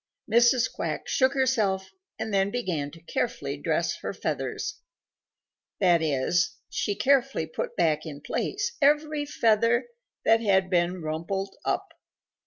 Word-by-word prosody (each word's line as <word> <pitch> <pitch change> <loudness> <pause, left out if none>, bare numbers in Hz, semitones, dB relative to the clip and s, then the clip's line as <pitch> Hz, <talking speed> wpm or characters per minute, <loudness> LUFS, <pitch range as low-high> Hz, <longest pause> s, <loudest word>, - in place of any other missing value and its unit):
Mrs. 235 +2 +4
Quack - - -3
shook 265 +1 +2
herself 215 -8 +1 0.3
and 220 -1 -4
then 195 0 +3
began 180 -11 -2
to 165 +2 -15
carefully - - -2
dress - - -1
her - - -5
feathers. - - -3 1.0
That 175 -4 +4
is, 155 +3 +1
she 205 - -1
carefully 270 -7 +2
put 160 - -5
back 155 -1 +1
in 145 -2 -8
place 410 - -2
every 295 +1 +2
feather 230 - +2 0.4
that 225 0 +5
had 190 -3 +2
been 175 0 +1
rumpled 170 +5 -3
up. - - -1
200 Hz, 130 wpm, -27 LUFS, 170-255 Hz, 1.0 s, that